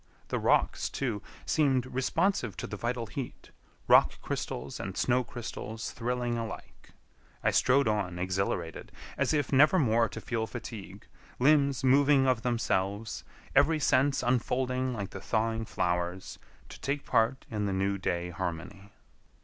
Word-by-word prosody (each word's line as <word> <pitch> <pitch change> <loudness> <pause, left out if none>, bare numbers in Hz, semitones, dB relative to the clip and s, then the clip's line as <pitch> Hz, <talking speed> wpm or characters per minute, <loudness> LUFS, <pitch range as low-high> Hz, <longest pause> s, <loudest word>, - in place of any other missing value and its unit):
The - - -1
rocks, - - +2
too, 115 -7 -2 0.2
seemed 135 -5 +2
responsive 130 - 0
to - - -4
the - - -5
vital 120 +2 -2
heat—rock 125 +3 0
crystals - - -4
and - - -5
snow 125 0 +2
crystals 115 -2 -6
thrilling 120 0 -2
alike. 115 -1 -8 0.5
I - - +3
strode 135 0 +3
on 100 -5 -1
exhilarated, 90 -2 -2 0.2
as - - +1
if 145 -3 0
never 150 +7 +6
more 115 -6 +3
to - - -7
feel 115 -2 -2
fatigue, 105 -5 -8 0.3
limbs 140 -1 +3
moving 135 +1 +5
of 130 -3 +2
themselves, 110 -3 -1 0.3
every 150 +3 +4
sense 140 -1 +2
unfolding 125 +1 0
like 100 -5 -4
the 95 - -7
thawing 115 +1 0
flowers, 90 -1 -2 0.3
to - - -11
take 140 +1 -2
part 115 +4 +1
in 105 -2 -1
the - - -1
new 100 +1 0
day 90 -1 -2
harmony. 90 +4 -6
115 Hz, 140 wpm, -29 LUFS, 100-130 Hz, 0.5 s, never